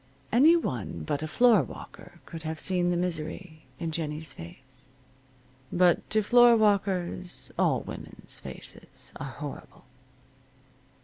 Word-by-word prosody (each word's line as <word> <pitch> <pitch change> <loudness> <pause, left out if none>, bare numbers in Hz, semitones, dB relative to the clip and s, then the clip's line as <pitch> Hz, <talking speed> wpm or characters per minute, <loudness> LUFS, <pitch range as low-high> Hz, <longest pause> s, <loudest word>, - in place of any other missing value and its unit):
Any 290 +9 +6
one 120 - -3
but 145 - -2
a 155 - -3
floorwalker 215 - +1
could 165 - -8
have 160 0 -4
seen 180 -2 +2
the 175 - +1
misery 160 -1 -4
in 165 +2 -3
Jennie's 155 -2 -3
face. 130 +9 -13 0.8
But 175 -1 +3
to 215 0 +2
floorwalkers 200 -6 +3
all - - +2
women's - - -8
faces - - -9
are 140 - -5
horrible. 145 -1 -9
170 Hz, 115 wpm, -28 LUFS, 150-200 Hz, 0.8 s, Any